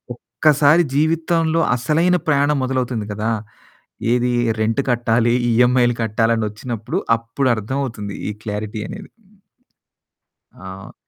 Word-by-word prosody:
ఒక్కసారి 145 +6 +3
జీవితంలో 165 +1 +1
అసలైన 160 +8 +2
ప్రయాణం 145 -1 +2
మొదలవుతుంది 125 -4 -2
కదా. 110 +2 -2 0.8
ఏది 125 0 +1 0.3
రెంట్ 110 +4 +1
కట్టాలి, 120 0 +2 0.2
ఈఎమ్ఐలు 120 +1 +3
కట్టాలి 115 +1 +1
అనొచ్చినప్పుడు 110 +2 -3 0.2
అప్పుడు 115 +4 -2
అర్థం 110 +6 -3
అవుతుంది 105 -5 -6 0.2
ఈ - - -3
క్లారిటీ 105 0 -4
అనేది. 205 -1 -9 1.4
ఆ! 95 +1 -10
120 Hz, 105 wpm, -20 LUFS, 110-145 Hz, 1.4 s, ఒక్కసారి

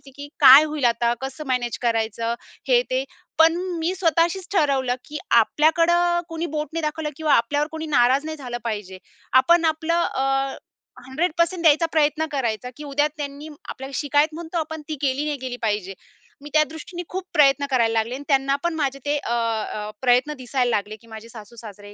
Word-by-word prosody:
की 285 0 -8
काय 275 +1 +10
होईल 300 -3 -2
आता, 235 0 +2
कसं 270 +3 -6
मॅनेज 250 -2 -1
करायचं? 230 -1 -1 0.3
हे - - +4
ते - - 0 0.3
पण 325 +1 +5 0.2
मी 330 +3 -1
स्वतःशीच 340 +1 +1
ठरवलं 275 -8 +1
की 300 - -6 0.2
आपल्याकडं 345 +6 +2
कोणी 330 0 -4
बोट 300 0 -2
नाही 330 - -2
दाखवलं 305 0 -3
किंवा 310 -2 +1
आपल्यावर 290 +6 +2
कोणी 320 0 -5
नाराज 265 0 +3
नाही 315 0 -5
झालं 250 -4 -5
पाहिजे. 205 -5 -5 0.4
आपण 340 +3 +3
आपलं 320 +2 +1
अ, 270 -1 -1 0.5
100% 335 +5 0
द्यायचा 320 +1 +5
प्रयत्न 310 0 +1
करायचा, 245 -4 -2
की 300 - -8
उद्या 290 +1 +1
त्यांनी 290 +1 -6 0.2
आपल्याला 270 +1 -7
शिकायत 295 +1 +1
म्हणतो 335 +1 -6
आपण 315 -1 -4
ती 310 - -2
केली 275 +1 0
नाही 300 -1 -2
केली 255 -2 -6
पाहिजे. 205 -4 -2 0.5
मी 295 - -10
त्या 310 0 +5
दृष्टीने 345 +3 -8
खूप 375 +1 -4
प्रयत्न 280 -1 +4
करायला 230 -3 +2
लागले 225 +2 -1
आणि 280 - -8
त्यांना 275 -1 +2
पण 345 -1 0
माझे 275 -3 -2
ते 290 +1 +1
अ, 255 - -5
अ 225 -2 -2
प्रयत्न 250 +3 +3
दिसायला 255 0 -1
लागले 210 -1 -2
की 230 - -20
माझे 220 0 -11
सासू 220 0 -12
सासरे 205 -2 -11
285 Hz, 180 wpm, -22 LUFS, 245-315 Hz, 0.5 s, काय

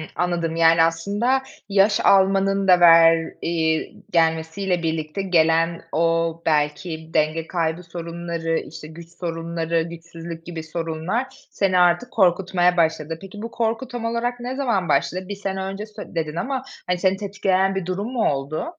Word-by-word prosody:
anladım. 170 -2 -1
Yani, 165 0 +5
aslında 205 +11 0 0.3
yaş 200 +1 +3
almanın 195 0 +3
da 180 -1 +6
ver 165 -1 +6
eee, 160 -1 0 0.2
gelmesiyle 165 +2 0
birlikte 160 +2 -2
gelen, 165 -2 +2
o 165 0 +1
belki 160 +1 -1
denge 155 +1 +1
kaybı 165 0 -2
sorunları, 170 -1 -3
işte, 160 0 -10
güç 165 +1 -12
sorunları, 165 -1 -2
güçsüzlük 165 0 -9
gibi 165 -2 -6
sorunlar 165 +9 -4
seni 190 -2 +1
artık 180 +8 +3
korkutmaya 180 -2 +2
başladı. 160 -1 0
Peki, 195 +2 -10
bu 230 +1 -6
korku 230 +2 -1
tam 240 -2 -6
olarak 235 +2 -2
ne 250 +2 -4
zaman 230 - 0
başladı? 180 +6 0
1 205 - -5
sene 195 -1 -4
önce 195 +2 -5
sö 210 -4 -11
dedin 155 -1 -2
ama 260 +9 -2 0.3
seni 190 +2 +1
tetikleyen 195 -1 0
bir 190 -2 -2
durum 185 +4 -3
mu 235 -3 +2
oldu? 140 - -3
170 Hz, 145 wpm, -22 LUFS, 165-195 Hz, 0.3 s, da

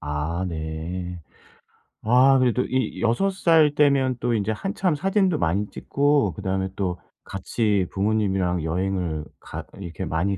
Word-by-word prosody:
아 75 +5 -3
네. 85 +3 -5 0.8
아 130 +4 +5
그래도 125 0 +2
이 130 -3 -2
6 120 +13 +2
살 165 -5 +4
때면 135 -4 +3
또 120 0 0
인제 110 0 0
한참 185 - -1
사진도 190 0 +1
많이 100 - 0
찍고 140 - +1
그다음에 95 0 -2
또 90 -3 -2 0.2
같이 100 -1 -1
부모님이랑 95 -4 0
여행을 85 -2 -2
가 - - -7 0.2
이렇게 85 -5 -6
많이 95 +4 -1
100 Hz, 250 characters per minute, -24 LUFS, 90-130 Hz, 0.8 s, 아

